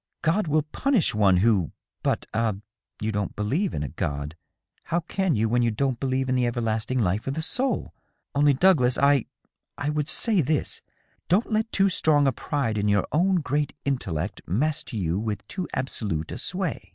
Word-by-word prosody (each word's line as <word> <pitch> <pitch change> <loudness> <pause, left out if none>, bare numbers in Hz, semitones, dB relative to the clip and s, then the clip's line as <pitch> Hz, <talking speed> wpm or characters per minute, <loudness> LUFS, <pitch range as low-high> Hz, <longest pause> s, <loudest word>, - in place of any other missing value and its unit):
" - - -46
God 170 +4 +2
will 155 0 +2
punish 210 - +1
one 100 -4 +4
who 95 -4 +2
— - - -56
^But - - 0
ah, 110 -1 +1 0.4
you 110 +1 -1
don't 100 -2 -2
believe 145 - -1
in 75 - -2
a - - -3
God: 70 +4 -4 0.2
*. - - -44
how 170 +2 0
can 180 -1 0
you, 110 +1 +1
when 120 +2 +2
you 120 - +3
don't 125 +2 -1
believe 130 0 0
in 130 - +1
the 125 -1 +2
everlasting 115 +1 -1
life 105 -1 0
of 135 - -1
the 160 - -2
soul? 260 +9 -1 0.4
Only, 145 0 +4
Douglas, 135 -6 +4
I 140 -3 +4 0.3
— - - -61
I 145 +1 -1
would 150 0 -1
say 215 -1 +3
this: 150 +1 -1 0.5
Don't 205 +7 +2
let 220 +1 0
too 195 0 +3
strong 155 -6 +3
a 135 - +4
pride 115 -4 -2
in 105 - 0
your 100 -2 +2
own 180 +3 +2
great 145 0 -1
intellect 100 - -2
master 145 - -1
you 90 -1 0
with 105 -2 -4
too 185 -4 -4
absolute 105 - -3
a - - -5
sway - - -3
130 Hz, 200 wpm, -25 LUFS, 105-155 Hz, 0.5 s, one